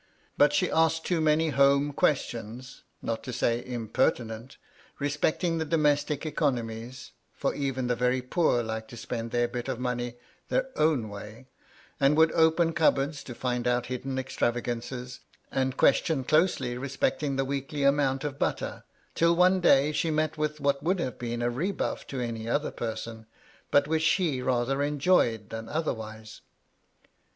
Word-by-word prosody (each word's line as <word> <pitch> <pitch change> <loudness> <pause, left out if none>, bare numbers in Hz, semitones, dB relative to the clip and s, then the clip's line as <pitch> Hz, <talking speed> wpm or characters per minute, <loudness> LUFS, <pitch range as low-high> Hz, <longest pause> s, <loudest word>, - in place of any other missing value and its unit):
But 145 0 +5
she 180 +4 +1
asked 160 0 +2
too 175 -3 +1
many 155 +1 +3
home 140 0 +3
questions 125 -4 -2 0.2
(not 115 -1 -2
to 130 - -5
say 120 0 0
imperti 120 0 0
nent) 115 +3 -9 0.4
respecting 155 +4 0
the - - 0
domestic 150 -1 +1
economies 125 -5 -2 0.2
(for - - -1
even 135 -3 -2
the 125 0 +1
very 125 +1 +1
poor 125 -3 +1
like 110 0 -4
to 120 - -11
spend 115 0 -4
their 120 0 +1
bit 120 +1 -5
of 130 -3 -3
money 120 -1 -2 0.3
their 260 0 0
own 150 -7 +2
way), 105 +4 -9 0.5
and 140 +2 +4
would 160 0 +5
open 165 +1 +3
cupboards 150 -3 +1
to 120 - -8
find 125 -1 -2
out 120 0 +1
hidden 130 +1 -4
extravagances, 120 0 -3 0.3
and 130 0 -1
question 150 -5 +3
closely 135 -5 +1
respecting 140 +1 -1
the 135 0 0
weekly 140 +1 -3
amount 140 -1 +2
of 140 -2 -4
butter, - - -2 0.3
till 170 +1 +3
one 185 +2 +4
day 145 -4 +4
she 165 +2 0
met 155 0 0
with 150 -1 -2
what 140 -1 +1
would 180 +5 +1
have 130 -6 -3
been 120 0 -3
a 120 - +2
rebuff 175 +11 -2
to 135 - -5
any 115 -2 -4
other 145 +5 0
person, 110 -1 -5 0.4
but 145 - +4
which 160 0 +1
she 160 -4 +1
rather 130 +2 0
enjoyed 145 - +2
than 115 0 -6
otherwise. 110 -8 -4
135 Hz, 160 wpm, -28 LUFS, 120-150 Hz, 0.5 s, But